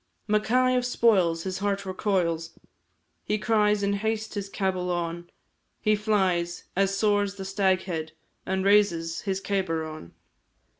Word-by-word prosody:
Mackay 250 +4 +2
of 250 - +1
Spoils, 190 -9 +2
his 190 0 -3
heart 200 0 -1
recoils, 175 -4 -1 0.7
He 210 - 0
cries 210 -2 +2
in 200 0 +1
haste 220 +1 -2
his 200 -2 -4
cabul 185 -3 -1
on, 175 0 -3 0.5
He 215 -1 +2
flies 190 -5 0
as 195 +1 +1
soars 205 -1 +1
the 195 -1 -7
Staghead, 185 -4 0 0.3
And 190 0 -1
raises 175 -5 +3
his 190 -1 -1
cabar 190 -5 -1
on. 155 - -9
195 Hz, 135 wpm, -26 LUFS, 175-210 Hz, 0.7 s, raises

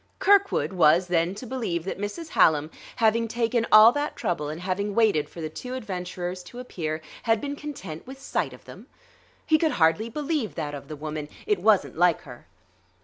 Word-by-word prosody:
Kirkwood 400 - +3
was, 175 0 +4
then, 175 +1 0
to 250 - -8
believe 220 -10 -3
that 190 - -5
Mrs. 205 +11 -5
Hallam, 160 - +3 0.2
having 230 0 +2
taken 230 0 0
all 215 +2 +9
that 290 +3 -3
trouble 170 -8 -2
and 155 +2 -5
having 195 +2 -2
waited 215 -10 +2
for 170 - -9
the 155 - -2
two 250 +11 -7
adventurers 180 -5 -5
to 240 - -12
appear, 160 -10 -4 0.2
had 225 -2 +2
been 285 +4 -4
content 245 - -8
with 265 +1 -9
sight - - -2
of - - -14
them? - - -12 0.6
He 310 -1 +3
could 315 -2 +1
hardly 165 +7 +2
believe 295 -2 -2
that 150 -3 -4
of 140 -1 -8
the 155 - -7
woman; 150 0 -5 0.2
it 210 -3 +1
wasn't 200 -3 +2
like 175 -2 +4
her. 125 -3 -13
200 Hz, 190 wpm, -25 LUFS, 165-240 Hz, 0.6 s, all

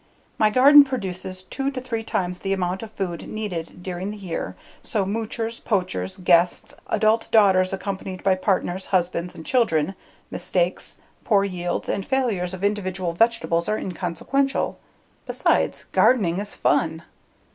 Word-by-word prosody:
My 215 - +5
garden 280 +6 +8
produces 190 -8 -5
two 270 +7 -2
to 270 -2 -4
three 240 -3 -3
times 180 -5 -2
the 195 +1 -1
amount 185 0 -1
of 225 - -7
food 185 -5 -4
needed 180 -5 -5
during 185 +1 -4
the 210 - -6
year 185 -5 -5 0.3
so 210 -6 -1
moochers, 225 +2 -3
poachers, 95 - -1
guests, 175 -1 +2
adult 220 +1 +2
daughters 190 -4 +5
accompanied 190 -1 -5
by 195 - +4
partners, 185 -1 -1
husbands, 175 -1 0
and 160 - -10
children, 190 - +2 0.4
mistakes, - - -1 0.3
poor 200 -3 +3
yields, 175 -3 -3
and 195 - -1
failures 210 -9 -1
of 185 - -10
individual 185 -4 -1
vegetables 225 -4 +1
are 215 - +1
inconsequential. 190 - -1 0.5
Besides, - - +1
gardening 195 -8 +3
is 205 0 -3
fun. 160 0 +1
190 Hz, 140 wpm, -23 LUFS, 180-220 Hz, 0.5 s, garden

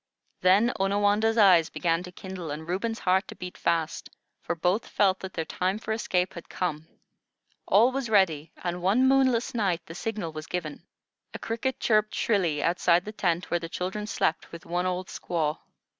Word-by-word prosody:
Then 200 +6 +4
Onawandah's 205 +3 +2
eyes 185 -6 +6
began 165 -1 0
to 180 0 -9
kindle, 185 -2 -7
and 155 +2 -6
Reuben's 225 +6 -2
heart 190 0 +1
to - - -9
beat 180 0 -8
fast, 165 -1 -1 0.3
for 175 - -3
both 180 +6 0
felt 190 -2 +2
that 190 -1 -7
their 165 - -2
time 185 +4 -1
for 220 0 -6
escape 185 -5 0
had 170 - -10
come. 160 -3 -3 0.8
All 230 +6 +5
was 265 -3 -3
ready, 170 -8 +2
and 175 0 -3
one 215 +9 +3
moonless 265 -2 +3
night 185 -7 0
the 165 - -9
signal 205 -3 -4
was 155 0 -8
given. 165 -4 -4 0.5
A - - -2
cricket 230 +3 -3
chirped 215 -1 +2
shrilly 175 -9 +1
outside 175 +1 +2
the 210 - -5
tent 175 -4 -1
where 175 - +2
the 165 0 -7
children 190 +5 -4
slept 160 - -1
with 170 - -10
one 175 +2 -1
old 185 0 -2
squaw. 155 -4 -2
185 Hz, 180 wpm, -27 LUFS, 170-210 Hz, 0.8 s, eyes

